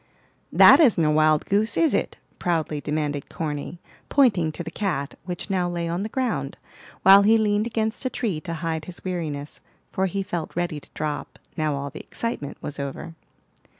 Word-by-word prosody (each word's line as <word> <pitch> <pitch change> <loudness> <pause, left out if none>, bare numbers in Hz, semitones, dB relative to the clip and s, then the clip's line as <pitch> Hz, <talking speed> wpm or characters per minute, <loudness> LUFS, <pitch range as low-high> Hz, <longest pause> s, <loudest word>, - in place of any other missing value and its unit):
"That - - +8
isn't 225 - +5
a 150 - +3
wild 155 0 +3
goose, 210 +3 +1
is 330 -2 +3
it?" - - -1 0.2
proudly 160 -4 -1
demanded 150 -2 -2
Corny, 155 0 -4 0.3
pointing 205 - +3
to 170 - -5
the 165 - -7
cat, 155 -10 -2
which 180 +2 -5
now 180 -2 +1
lay 170 -1 -2
on 170 +2 -2
the 215 - -3
ground, 215 - -2 0.5
while 195 +1 +9
he 220 +3 +5
leaned 210 0 +1
against 220 0 -2
a - - +2
tree 210 -11 -2
to 165 -1 -5
hide 160 -1 -3
his 175 0 -9
weariness; 155 -6 -4 0.3
for 190 0 0
he 195 +2 -2
felt 175 -4 -5
ready 175 -3 -2
to - - -20
drop, 150 -1 -4 0.2
now 155 -2 0
all 140 0 -4
the - - -8
excitement 190 -12 -5
was 145 - -6
over. 140 +4 -5
170 Hz, 185 wpm, -24 LUFS, 150-200 Hz, 0.5 s, while